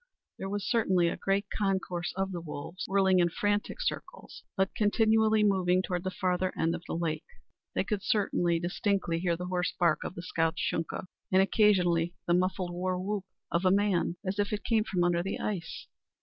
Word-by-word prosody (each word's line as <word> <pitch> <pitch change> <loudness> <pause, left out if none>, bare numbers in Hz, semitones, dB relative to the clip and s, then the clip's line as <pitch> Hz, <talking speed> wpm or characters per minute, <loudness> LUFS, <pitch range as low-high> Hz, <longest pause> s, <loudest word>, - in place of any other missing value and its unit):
There 195 - -4
was 205 0 -3
certainly 190 -8 +3
a - - -3
great 195 +1 0
concourse 190 -4 -1
of 195 0 -1
the 175 -2 -4
wolves, 160 +2 -6
whirling 190 -1 +3
in 175 -1 +4
frantic 205 - -1
circles, - - -5 0.2
but 190 0 +1
continually 220 0 +3
moving 185 -2 +3
toward 180 -1 -2
the 185 - -1
farther 185 0 0
end 165 +1 +1
of - - -4
the - - -3
lake. 160 -2 -2 0.5
They - - +2
could 210 -3 -2
hear 210 0 +1 0.3
distinctly 175 -1 0
the 175 0 0
hoarse 180 0 -1
bark 170 -3 +3
of - - -6
the 170 - -7
scout's 165 0 0
Shunka, 165 +3 -2 0.3
and 185 - +5
occasionally 180 -5 +3
the 175 - +2
muffled 185 0 0
war 180 +1 -1
whoop 195 +1 -3 0.3
of 170 +2 +1
a 185 - +5
man, 195 -3 +2
as 190 +2 -2
if 205 0 +1
it 210 -1 -3
came 220 -2 +2
from 180 -4 0
under 175 -1 +2
the 195 +3 -3
ice. 180 -6 -4
185 Hz, 190 wpm, -29 LUFS, 175-200 Hz, 0.5 s, and